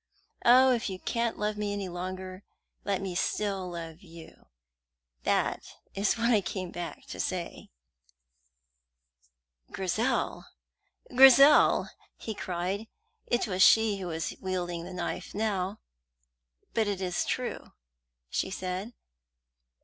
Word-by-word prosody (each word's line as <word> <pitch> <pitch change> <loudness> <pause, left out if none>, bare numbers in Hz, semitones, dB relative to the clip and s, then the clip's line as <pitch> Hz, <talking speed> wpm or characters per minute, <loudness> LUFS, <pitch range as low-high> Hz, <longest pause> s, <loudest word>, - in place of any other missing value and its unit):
Oh, 255 +2 +7
if 235 -3 0
you 190 - -5
can't 235 +4 -2
love 210 0 -2
me 205 -1 -2
any 200 -2 -3
longer, 185 +1 -6 0.4
let 195 -1 -1
me 190 -2 -3
still 195 0 -1
love 165 -1 -7
you! 165 -3 -14 0.8
That - - 0 0.2
is 200 +4 +1
what 235 +1 +2
I 215 -3 +4
came 185 0 -5
back 175 -1 -7
to - - -7
say." 180 -2 -4 2.0
"Grizel, 215 +7 -1 0.7
Grizel!" 270 +3 +7 0.3
he 220 - -5
cried. 190 +2 -3 0.4
It 240 - +1
was 190 -4 -2
she 220 0 +6
who 190 -2 -5
was 160 -1 -3
wielding 175 -2 -3
the 185 - -8
knife 175 +1 -4
now. 205 -1 -1 0.9
"But 220 -2 +1
it 200 -2 -2
is 180 -2 -1
true," - - -4 0.5
she 125 - -2
said. 185 +4 -4
190 Hz, 120 wpm, -29 LUFS, 180-215 Hz, 2.0 s, Oh